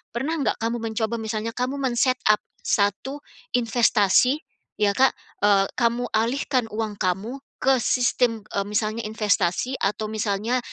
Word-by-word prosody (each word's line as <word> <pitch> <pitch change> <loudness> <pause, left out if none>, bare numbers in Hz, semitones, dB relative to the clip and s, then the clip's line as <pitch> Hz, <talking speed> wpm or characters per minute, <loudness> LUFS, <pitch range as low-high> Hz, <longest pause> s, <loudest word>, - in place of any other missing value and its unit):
pernah 290 +7 -1
nggak 280 - 0
kamu 230 +1 0
mencoba 225 0 -2
misalnya 220 0 -3
kamu 250 +2 -1
men-set 255 0 +2
up 215 - +5 0.2
satu 210 +8 0 0.4
investasi 240 +2 +3 0.4
ya 205 -1 +4
Kak, 265 +2 +5 0.3
eee, 200 -1 +4
kamu 240 0 +1
alihkan 250 +2 +1
uang 215 -1 -3
kamu 190 +7 -1 0.3
ke 265 0 +4
sistem, 245 -2 +1
eee, 200 - +1
misalnya 215 +2 -1
investasi 215 +2 0
atau 210 +2 -1
misalnya 215 +3 -1
225 Hz, 135 wpm, -24 LUFS, 210-250 Hz, 0.4 s, up